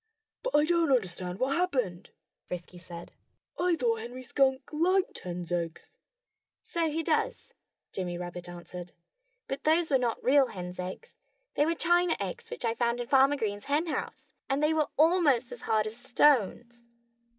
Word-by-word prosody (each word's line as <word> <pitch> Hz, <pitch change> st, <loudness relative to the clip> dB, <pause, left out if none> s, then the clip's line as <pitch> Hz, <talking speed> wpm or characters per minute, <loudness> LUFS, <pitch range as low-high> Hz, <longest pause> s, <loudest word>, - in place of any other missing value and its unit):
"But -, -, -2 dB
I 295 Hz, -, +5 dB
don't 335 Hz, -2 st, +2 dB
understand 185 Hz, -6 st, 0 dB
what 265 Hz, +4 st, 0 dB
happened," 250 Hz, -, -1 dB, 0.4 s
Frisky 180 Hz, 0 st, -7 dB
said. 170 Hz, -1 st, -10 dB, 0.5 s
"I 355 Hz, -1 st, +3 dB
thought 235 Hz, -6 st, 0 dB
Henry 245 Hz, +3 st, -7 dB
Skunk 265 Hz, 0 st, +1 dB
liked 365 Hz, +5 st, +1 dB
hens' 175 Hz, -1 st, -6 dB
eggs." 170 Hz, -2 st, -4 dB, 0.7 s
"So 335 Hz, -2 st, -1 dB
he 320 Hz, +2 st, -2 dB
does!" -, -, -1 dB, 0.4 s
Jimmy 175 Hz, -2 st, -3 dB
Rabbit 175 Hz, 0 st, -7 dB
answered. 175 Hz, 0 st, -9 dB, 0.5 s
"But 270 Hz, +1 st, -4 dB
those 320 Hz, +1 st, +2 dB
were 265 Hz, -, +4 dB
not 240 Hz, -2 st, -1 dB
real 270 Hz, 0 st, +5 dB
hens' 180 Hz, -3 st, -7 dB
eggs. 185 Hz, -, -6 dB, 0.4 s
They 295 Hz, -, +2 dB
were 335 Hz, -, +1 dB
china 345 Hz, 0 st, +3 dB
eggs 465 Hz, -2 st, -5 dB
which 475 Hz, -, -5 dB
I 225 Hz, -, +1 dB
found 235 Hz, +1 st, 0 dB
in 245 Hz, -, -2 dB
Farmer 275 Hz, +1 st, +5 dB
Green's 205 Hz, -4 st, -3 dB
henhouse. 305 Hz, +3 st, -2 dB, 0.2 s
And 275 Hz, +2 st, +1 dB
they 305 Hz, +1 st, +3 dB
were 310 Hz, -2 st, +2 dB
almost 300 Hz, -7 st, +4 dB
as 245 Hz, -1 st, -8 dB
hard 215 Hz, -1 st, +3 dB
as 215 Hz, +1 st, -6 dB
stones." 240 Hz, -2 st, +2 dB
255 Hz, 160 wpm, -29 LUFS, 190-310 Hz, 0.7 s, I